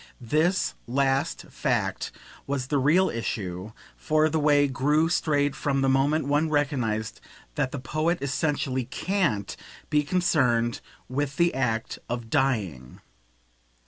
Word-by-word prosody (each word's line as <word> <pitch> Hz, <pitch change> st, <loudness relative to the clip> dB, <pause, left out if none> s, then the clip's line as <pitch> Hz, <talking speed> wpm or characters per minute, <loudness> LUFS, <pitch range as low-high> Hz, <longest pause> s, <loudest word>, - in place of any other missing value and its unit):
This 155 Hz, +9 st, +1 dB
last 135 Hz, +2 st, 0 dB
fact -, -, -1 dB, 0.4 s
was 140 Hz, -2 st, -1 dB
the 140 Hz, +2 st, 0 dB
real 165 Hz, +8 st, +4 dB
issue, 100 Hz, -4 st, -4 dB, 0.2 s
for 155 Hz, 0 st, +2 dB
the 160 Hz, +1 st, 0 dB
way 145 Hz, -1 st, +4 dB
grew 150 Hz, +5 st, +2 dB
straight 145 Hz, -4 st, +1 dB
from 140 Hz, -1 st, 0 dB
the 135 Hz, -, +2 dB
moment 140 Hz, +3 st, +2 dB
one 145 Hz, +3 st, +1 dB
recognised 125 Hz, -8 st, -1 dB, 0.3 s
that 130 Hz, -, -1 dB
the -, -, -4 dB
poet 155 Hz, +6 st, 0 dB
essentially 140 Hz, -2 st, -1 dB
CAN'T 145 Hz, -, -1 dB, 0.4 s
be 150 Hz, -1 st, +4 dB
concerned 130 Hz, -8 st, +1 dB, 0.3 s
with 140 Hz, +2 st, -2 dB
the 170 Hz, 0 st, +3 dB
act 115 Hz, -4 st, -1 dB
of 120 Hz, -2 st, -4 dB
dying. 100 Hz, -, -1 dB
140 Hz, 125 wpm, -26 LUFS, 120-155 Hz, 0.4 s, real